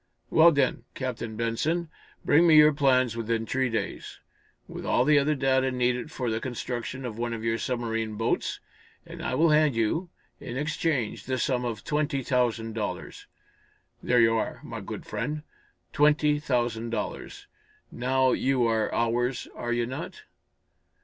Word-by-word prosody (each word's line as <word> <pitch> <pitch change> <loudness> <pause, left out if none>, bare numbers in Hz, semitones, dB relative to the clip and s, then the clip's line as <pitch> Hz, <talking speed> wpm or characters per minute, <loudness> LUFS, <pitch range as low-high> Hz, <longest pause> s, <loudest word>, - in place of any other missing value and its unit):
"Well, 165 +1 +7
then, 140 -4 +1
Captain 120 -4 -4
Benson, 155 +9 -1 0.4
bring 165 +4 +5
me 160 - +6
your 150 0 +7
plans 130 -4 +2
within 115 0 -1
three 130 +2 0
days, 115 - -4 0.5
with - - -8
all - - +2
the 150 -1 +5
other 150 +2 +1
data 130 -1 +2
needed 125 +2 0
for 125 -6 -3
the 110 - -1
construction 125 +1 -4
of 115 -2 -6
one 120 0 -2
of 115 -1 -5
your 115 0 0
submarine 115 -3 -2
boats, 115 +2 -1 0.5
and - - -9
I - - -2
will 160 +3 +4
hand 150 -3 +4
you, 115 - 0 0.3
in 120 - -6
exchange, 150 -5 -1
the 130 -1 -1
sum 125 -1 0
of 115 -4 -4
twenty 150 -2 -1
thousand 120 -3 0
dollars. 110 -2 -5 0.7
There 125 0 +2
you 115 -1 +5
are, 115 - -2
my - - -7
good - - -7
friend! 150 0 -4 0.5
Twenty 150 0 +3
thousand 120 -5 -1
dollars. 115 - -5 0.5
Now 130 +1 +1
you 130 -2 +1
are 110 -1 +1
ours, 120 +2 0
are 120 - -4
you 120 0 +1
not?" 155 - -7
125 Hz, 155 wpm, -27 LUFS, 115-145 Hz, 0.7 s, Well